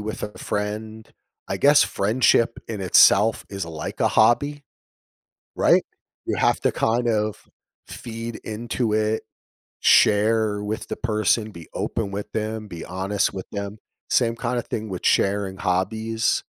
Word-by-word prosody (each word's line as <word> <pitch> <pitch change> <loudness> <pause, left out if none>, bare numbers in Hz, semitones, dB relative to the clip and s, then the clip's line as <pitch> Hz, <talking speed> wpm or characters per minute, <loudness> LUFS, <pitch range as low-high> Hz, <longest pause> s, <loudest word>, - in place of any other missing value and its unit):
with 110 +1 -5
a 105 - -6
friend 110 +2 -4 0.4
I 95 - -2
guess 145 +6 +6
friendship 115 +2 +2
in 110 -3 -4
itself 100 +3 +5
is 95 -4 -4
like 80 -2 -6
a - - +2
hobby, 145 +6 +2 0.9
right? - - +4 0.4
You - - -2
have - - +2
to - - +1
kind 120 +2 0
of 105 -2 -1 0.4
feed 115 0 -7
into 115 +1 -3
it, 110 0 0 0.6
share 105 0 +3
with 105 +1 -4
the - - -2
person, 110 -1 0
be 85 -4 -11
open 110 -4 -3
with 100 +1 -6
them, 110 0 -3
be 85 -4 -8
honest 95 +3 -1
with 95 -1 -6
them. 100 +1 -5 0.3
Same 115 -2 +2
kinda 120 +1 -2
thing 110 -2 -5
with 90 -2 -6
sharing 100 -1 +1
hobbies, 110 +6 0
110 Hz, 140 wpm, -23 LUFS, 100-115 Hz, 0.9 s, guess